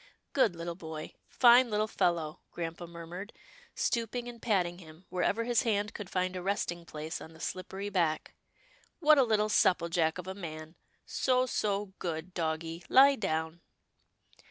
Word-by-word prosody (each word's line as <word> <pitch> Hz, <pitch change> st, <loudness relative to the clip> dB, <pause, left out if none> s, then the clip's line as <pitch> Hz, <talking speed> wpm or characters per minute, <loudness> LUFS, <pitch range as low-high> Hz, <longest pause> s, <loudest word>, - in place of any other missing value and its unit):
" -, -, -49 dB
Good 225 Hz, -10 st, +3 dB
little 170 Hz, 0 st, -4 dB
boy, 160 Hz, -2 st, -7 dB
fine 245 Hz, 0 st, +6 dB
little 210 Hz, 0 st, +1 dB
fellow," 170 Hz, -6 st, 0 dB
grampa 170 Hz, 0 st, -5 dB
mur 170 Hz, 0 st, -9 dB
mured, 180 Hz, +6 st, -8 dB, 0.4 s
stooping 235 Hz, +1 st, -1 dB
and 235 Hz, -1 st, -9 dB
patting 180 Hz, -6 st, +1 dB
him, 160 Hz, +1 st, -14 dB
wherever 185 Hz, +5 st, 0 dB
his 240 Hz, 0 st, +2 dB
hand 210 Hz, -3 st, 0 dB
could 200 Hz, -3 st, -7 dB
find 185 Hz, 0 st, -1 dB
a 180 Hz, -, -3 dB
resting 175 Hz, -3 st, -2 dB
place 155 Hz, +2 st, -5 dB
on 160 Hz, -, -10 dB
the 160 Hz, -, -15 dB
slippery 190 Hz, +3 st, -4 dB
back. 170 Hz, -5 st, 0 dB, 0.3 s
" -, -, -32 dB
What 305 Hz, -3 st, +6 dB
a -, -, +7 dB
little 215 Hz, -3 st, +2 dB
supple 180 Hz, -5 st, +3 dB
jack 165 Hz, -1 st, +1 dB
of 180 Hz, -, -6 dB
a 190 Hz, -, -4 dB
man. 160 Hz, -4 st, -7 dB, 0.3 s
So, 255 Hz, -1 st, +2 dB
so, 205 Hz, -5 st, -1 dB
good 170 Hz, +1 st, -4 dB
doggie, 165 Hz, 0 st, -3 dB
lie 275 Hz, +2 st, +7 dB
down." 160 Hz, -5 st, -2 dB
180 Hz, 170 wpm, -31 LUFS, 165-215 Hz, 0.4 s, a